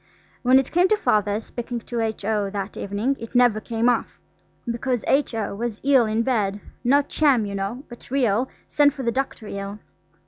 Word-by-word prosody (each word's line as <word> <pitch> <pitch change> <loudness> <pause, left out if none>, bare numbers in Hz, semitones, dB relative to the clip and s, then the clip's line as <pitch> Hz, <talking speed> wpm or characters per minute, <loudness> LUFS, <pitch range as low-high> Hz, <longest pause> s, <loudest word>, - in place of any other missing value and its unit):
When 255 +1 +5
it 270 -1 +1
came 355 +2 +4
to 430 - +3
Father's 210 - +1
speaking 240 0 -5
to 235 +2 -4
H.O. 215 -2 -1
that 200 0 -5
evening 205 +7 -1
it 230 +2 -9
never 245 -3 +4
came 230 +2 -1
off, 245 -2 0 0.5
because 240 0 -2
H.O. 225 -8 +1
was 225 +1 -4
ill 265 -4 +4
in 220 +2 +1
bed, 210 -5 0 0.2
not 280 +3 +3
sham, 275 -8 +3
you 200 - -5
know, 200 +7 -3
but 240 - -12
real, 250 -2 +1 0.2
send 290 -1 +3
for 270 - -5
the 235 - +1
doctor 260 -3 -3
ill. 200 0 -5
235 Hz, 180 wpm, -23 LUFS, 210-260 Hz, 0.5 s, When